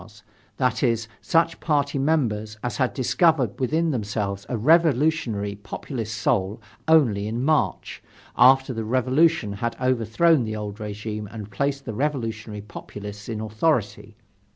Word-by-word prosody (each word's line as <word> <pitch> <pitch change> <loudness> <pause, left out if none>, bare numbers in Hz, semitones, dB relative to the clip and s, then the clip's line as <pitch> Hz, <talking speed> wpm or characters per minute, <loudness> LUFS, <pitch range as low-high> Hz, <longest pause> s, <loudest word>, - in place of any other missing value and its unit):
's" 105 -1 -16 0.3
that 125 -4 +1
is, 115 -3 +1
such 165 0 +1
party 145 -3 0
members 110 -8 0
as 125 - -3
had 130 -2 +1
discovered 135 - +2
within 160 +5 +1
themselves 105 -4 -3
a 125 - -1
revolutionary 140 -6 +2
populist 110 +2 -6
soul 100 -2 0 0.3
only 120 -11 +4
in 115 +4 -2
March, 155 0 0 0.3
after 130 +1 +5
the 115 -1 -3
Revolution 130 +1 +2
had 115 +4 -3
overthrown 130 +5 +2
the 110 -1 -4
old 105 0 -6
regime 105 0 -5
and 105 -2 -8
placed 140 +6 -2
the 110 - -4
revolutionary 115 -5 -3
populists 105 0 -9
in 110 -2 -3
authority. 110 +2 -1
115 Hz, 135 wpm, -24 LUFS, 105-140 Hz, 0.3 s, after